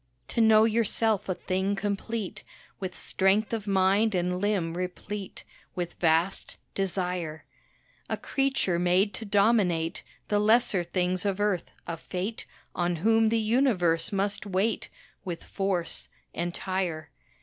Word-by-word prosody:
To 235 - +1
know 220 -1 +7
yourself 225 -2 +1
a 185 - 0
thing 190 +3 -1
complete, 205 +1 -3 0.4
With 185 -2 -4
strength 200 +4 +1
of 215 -2 -3
mind 195 +2 +3
and 180 +1 0
limb 190 -5 0
replete, 185 +2 -5 0.3
With 175 -1 -3
vast 165 +3 +1 0.2
desire; 180 -4 -2 0.6
A - - -1
creature 270 -10 0
made 180 +3 +3
to 220 - -6
dominate 200 -5 +2 0.3
The 205 - +2
lesser 215 -2 +4
things 180 +1 0
of 200 -1 -1
earth, 205 -4 0 0.2
a 165 - -4
fate 185 +7 -5 0.3
On 175 0 0
whom 225 +6 +3
the 230 - +2
universe 215 -8 +2
must 200 +1 -1
wait, 200 +3 0 0.3
With 175 -3 -5
force 195 -4 -2 0.2
entire. 175 -1 -3
195 Hz, 125 wpm, -28 LUFS, 180-215 Hz, 0.6 s, know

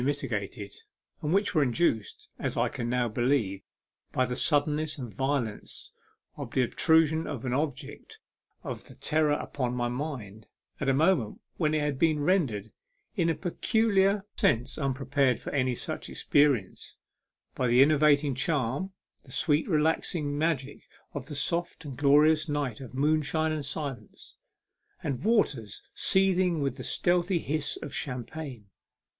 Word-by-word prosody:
mitigated, 110 -8 -3 0.5
and 150 - -2
which 200 +3 +2
were 155 - +3
induced, 125 - 0
as - - -2
I - - +2
can 120 - -4
now 125 0 +1
believe, 115 -4 0 0.5
by 130 - +1
the 125 0 -3
suddenness 150 +2 +1
and 120 -6 -7
violence 130 -2 -3 0.5
of - - -6
the 130 - +1
obtrusion 160 +4 +3
of 135 -5 -5
an 125 - -1
object 145 +2 -4 0.5
of - - -8
terror 155 -1 +2
upon 125 -4 -3
my 120 -1 -1
mind 120 -7 -5 0.3
at 140 - 0
a - - +4
moment 155 - +2 0.2
when 155 -2 +1
it 155 - +1
had 145 -2 -1
been 160 -2 +3
rendered 145 - +1 0.4
in 170 -5 +2
a 165 - +1
peculiar 200 +2 +1
sense 120 +2 +1
unprepared 135 -2 +1
for - - -6
any 130 -3 +1
such - - -4
experience 140 -10 +1 0.6
by 125 - 0
the 120 +3 +6
enervating 145 -1 +4
charm, 140 +5 -1 0.3
the 130 - -16
sweet 150 +3 +1
relaxing 155 -2 +1
magic 145 -3 -1 0.3
of 140 -3 -6
the 150 - -6
soft 170 +3 -1
and 140 -3 -6
glorious 150 +3 +4
night 140 -5 -2
of 130 -1 -9
moonshine 155 +2 +1
and 155 -2 -3
silence, 140 -6 -5 0.7
and 135 -3 -3
waters 145 - +1
seething 185 -3 +2
with 140 -1 -1
the 130 - -6
stealthy 175 +4 +1
hiss 155 -2 -2
of 145 - -7
champagne. 125 -2 -5
145 Hz, 145 wpm, -28 LUFS, 125-160 Hz, 0.7 s, the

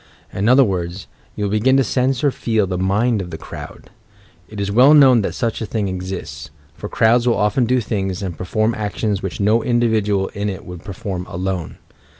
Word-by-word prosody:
In 100 +4 0
other 130 +2 +6
words, 90 -3 -3 0.3
you 105 - -4
will 100 - -1
begin 125 +6 +3
to 135 - +4
sense 130 +1 0
or 145 - +3
feel 110 -4 0
the 95 -1 -3
"mind 105 +4 +1
of 90 - -7
the 80 - -6
crowd." - - -10 0.6
It 105 - -8
is 100 0 -2
well 130 +8 +6
known 130 -5 +6
that - - -3
such 115 -3 -2
a - - -2
thing 105 -2 -2
exists, 90 -6 -6
— 75 0 -32
for - - -8
crowds 120 +2 +3
will 120 - +2
often 105 +4 +1
do 125 +2 +2
things 95 -3 -3
and 90 -3 -4
perform 110 +5 -1
actions 105 -1 -2
which 95 -3 -5
no 105 +3 +3
individual 110 -5 +1
in 100 +1 -3
it 95 - -7
would 90 -1 -9
perform 95 -2 -5
alone. 90 -1 -4
105 Hz, 205 wpm, -19 LUFS, 95-120 Hz, 0.6 s, other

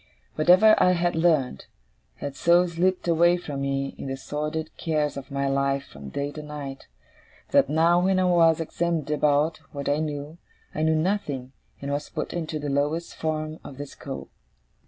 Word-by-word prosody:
Whatever 185 +7 +6
I 180 0 +5
had 175 0 +1
learnt, 160 - +1 0.5
had 140 -1 -6
so 170 +6 +4
slipped 180 +2 0
away 170 +1 +4
from 145 -5 -5
me 135 0 -1
in - - -5
the 135 0 -3
sordid 150 +3 -4
cares 155 -3 -1
of 140 - -7
my 140 0 -1
life 140 0 +1
from 70 0 -10
day 140 - -3
to 150 - -7
night, 145 -2 -7 0.6
that 140 - +4
now, 165 +3 +4
when 190 0 +3
I 185 - +3
was 165 -3 +4
examined 165 -2 -1
about 150 +1 +2
what 140 -1 -5
I 145 - +2
knew, 150 +1 -4 0.3
I - - -3
knew 160 0 +3
nothing, 155 -7 -1 0.3
and 140 - -3
was 145 +1 -3
put - - -4
into 160 -2 -3
the 145 -1 -4
lowest 145 +4 -1
form 155 0 -3
of 135 - -10
the 145 - -5
school. - - -8
155 Hz, 175 wpm, -25 LUFS, 140-170 Hz, 0.6 s, Whatever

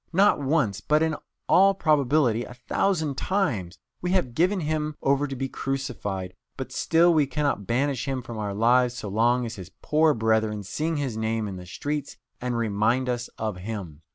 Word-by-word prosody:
Not 190 -2 +4
once, 135 -8 +1
but, 150 +1 +2
in 160 -1 0 0.3
all 195 +1 +5
probability, 140 - +2
a 125 - -10
thousand 155 +2 0
times, 110 - -1 0.2
we 180 +1 -1
have 155 -11 +1
given 180 +7 +2
Him 155 -1 -1
over 140 +1 +2
to 135 - -5
be 135 +1 -2
crucified, 115 -10 -4 0.2
but 130 - -5
still 170 +1 +3
we 150 -3 +3
cannot 140 -9 -1
banish 130 +2 0
Him 130 -2 -2
from 115 -3 -7
our 100 -2 -3
lives 120 +3 +3
so 105 -4 -5
long 120 +4 +2
as 115 -1 -6
His 90 -2 -8
poor 155 0 +3
brethren 110 -2 +1
sing 155 - -2
His 135 -6 -2
name 110 0 -1
in 95 -2 -6
the 90 0 -10
streets 145 +8 -4 0.2
and 125 -1 -1
remind 115 +3 +1
us 120 0 -2
of 110 -4 -3
Him. 90 -6 -6
125 Hz, 180 wpm, -26 LUFS, 110-150 Hz, 0.3 s, all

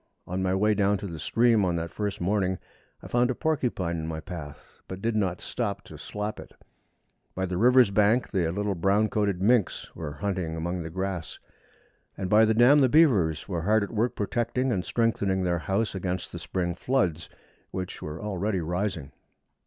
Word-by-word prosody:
On 90 +1 -3
my 95 0 +1
way 105 +2 +3
down 100 0 +2
to 100 - -7
the 85 -5 -6
stream 115 +1 +3
on 90 -2 +1
that 85 0 -3
first 105 -2 -3
morning, 95 0 0 0.5
I - - -8
found 120 +1 +2
a 130 - 0
porcupine 125 - -1
in 80 - -4
my 80 -1 -4
path, 75 -3 -10
but 95 - -6
did 115 +2 -1
not 95 -5 0
stop 110 -5 -3
to - - -11
slap 105 +1 -5
it. - - -11 0.8
By 95 - -1
the 90 -1 -3
river's 125 -1 +6
bank 105 +4 +3
the 90 -5 +1
little 100 +2 -1
brown 100 +5 +2
coated 100 -3 0
minks 115 -2 +1
were 75 -3 -5
hunting 90 0 -3
among 85 +2 -3
the 80 - -5
grass, 95 -2 -4 0.8
and 95 -2 -4
by 110 +1 +7
the 110 0 +2
dam 125 +6 +6
the 130 -2 +4
beavers 105 - +3
were 90 -4 -2
hard 105 +4 +3
at 100 - -6
work 115 +3 0
protecting 120 +4 -1
and 95 -6 0
strengthening 100 -5 0
their 85 -1 0
house 100 +6 -1
against 95 -1 -3
the 85 - -6
spring 85 +2 -2
floods, 90 - -1 0.4
which 95 -1 -5
were 75 +2 -6
already 100 0 -2
rising. 90 -3 -3
95 Hz, 190 wpm, -27 LUFS, 90-110 Hz, 0.8 s, by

